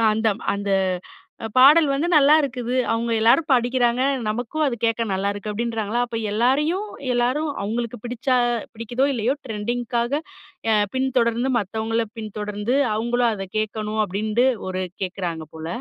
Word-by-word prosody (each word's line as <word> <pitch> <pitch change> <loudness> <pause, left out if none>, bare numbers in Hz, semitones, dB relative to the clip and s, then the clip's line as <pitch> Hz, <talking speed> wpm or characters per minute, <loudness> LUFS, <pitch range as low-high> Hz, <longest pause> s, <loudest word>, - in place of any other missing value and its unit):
அந்த, 220 0 +1 0.3
அந்த 200 0 -3 0.7
அ - - -1
பாடல் 295 +5 +7
வந்து 285 +5 0
நல்லாயிருக்குது. 275 -5 +3 0.2
அவுங்க 230 +1 -1
எல்லாரும் 250 +8 +4
படிக்கிறாங்க. 245 0 +2 0.3
நமக்கும் 245 +8 -1
அது 260 - 0
கேட்க 230 0 +1
நல்லாயிருக்கு 200 +2 -2
அப்பிடின்றாங்களா, 225 +1 -2
அப்ப 230 -1 -4
எல்லாரையும் 295 - +1 0.3
எல்லாரும் 255 +6 +1
அவுங்களுக்கு 235 +3 -3
பிடிச்சா 250 +2 0 0.4
பிடிக்குதோ 235 +4 -1
இல்லயோ 240 +1 0
ட்ரெண்டிங்குக்காக 240 +4 -2 0.5
அ - - +5 0.2
பின்தொடர்ந்து 255 -2 +1
மத்தவங்கள 220 +3 -1
பின்தொடர்ந்து 210 +2 -3 0.2
அவுங்களும் 235 +2 +1
அத 195 -2 -4
கேட்கணும், 215 0 -3
அப்பிடின்ட்டு 215 +5 0 0.2
ஒரு 185 0 -2 0.2
கேட்குறாங்க 180 -3 -3
போல. 160 0 -7
235 Hz, 125 wpm, -22 LUFS, 215-255 Hz, 0.7 s, பாடல்